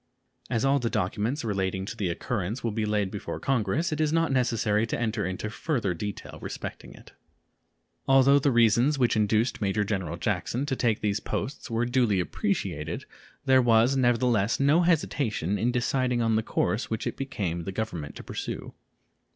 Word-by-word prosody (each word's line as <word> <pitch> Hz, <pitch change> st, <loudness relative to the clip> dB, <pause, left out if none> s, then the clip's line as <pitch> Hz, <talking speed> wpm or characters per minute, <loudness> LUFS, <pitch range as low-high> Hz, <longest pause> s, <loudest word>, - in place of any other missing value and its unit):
As 115 Hz, +2 st, 0 dB
all 140 Hz, +1 st, +3 dB
the 120 Hz, -2 st, -1 dB
documents 115 Hz, -, -1 dB
relating 95 Hz, -2 st, -1 dB
to 115 Hz, -, -6 dB
this 100 Hz, -5 st, -1 dB
occurrence 105 Hz, +5 st, -3 dB
will 115 Hz, -, 0 dB
be 105 Hz, 0 st, -1 dB
laid 105 Hz, -2 st, 0 dB
before 105 Hz, -, -5 dB
Congress, 135 Hz, -, 0 dB
it 155 Hz, 0 st, -1 dB
is 155 Hz, -1 st, +2 dB
not 165 Hz, -2 st, +2 dB
necessary 115 Hz, -4 st, +1 dB
to -, -, -2 dB
enter 110 Hz, -3 st, -1 dB
into 95 Hz, +3 st, -4 dB
further 115 Hz, -, -1 dB
detail 100 Hz, +4 st, -6 dB
respecting -, -, -7 dB
it. -, -, -16 dB, 1.0 s
Although 135 Hz, +1 st, +6 dB
the 140 Hz, -, +2 dB
reasons 120 Hz, +4 st, +4 dB
which 125 Hz, -3 st, +2 dB
induced 110 Hz, +3 st, +1 dB
Major 100 Hz, +1 st, +1 dB
General 95 Hz, -6 st, -3 dB
Jackson 130 Hz, +4 st, -1 dB
to 135 Hz, -, -1 dB
take 115 Hz, -4 st, 0 dB
these 105 Hz, -1 st, 0 dB
posts 140 Hz, +1 st, -4 dB
were 115 Hz, +1 st, 0 dB
duly 120 Hz, -5 st, +2 dB
appreciated, 90 Hz, -, -2 dB, 0.4 s
there 130 Hz, 0 st, +5 dB
was 120 Hz, +2 st, +4 dB
nevertheless 120 Hz, -4 st, +2 dB
no 145 Hz, +5 st, +4 dB
hesitation 135 Hz, -, 0 dB
in 120 Hz, +2 st, +1 dB
deciding 125 Hz, 0 st, 0 dB
on 115 Hz, -1 st, +2 dB
the 110 Hz, -, +2 dB
course 110 Hz, +1 st, -1 dB
which 110 Hz, -, -3 dB
it -, -, -2 dB
became 95 Hz, -11 st, -3 dB
the 95 Hz, -, -3 dB
Government 95 Hz, -8 st, -4 dB
to -, -, -9 dB
pursue. -, -, -5 dB
115 Hz, 175 wpm, -27 LUFS, 105-130 Hz, 1.0 s, Although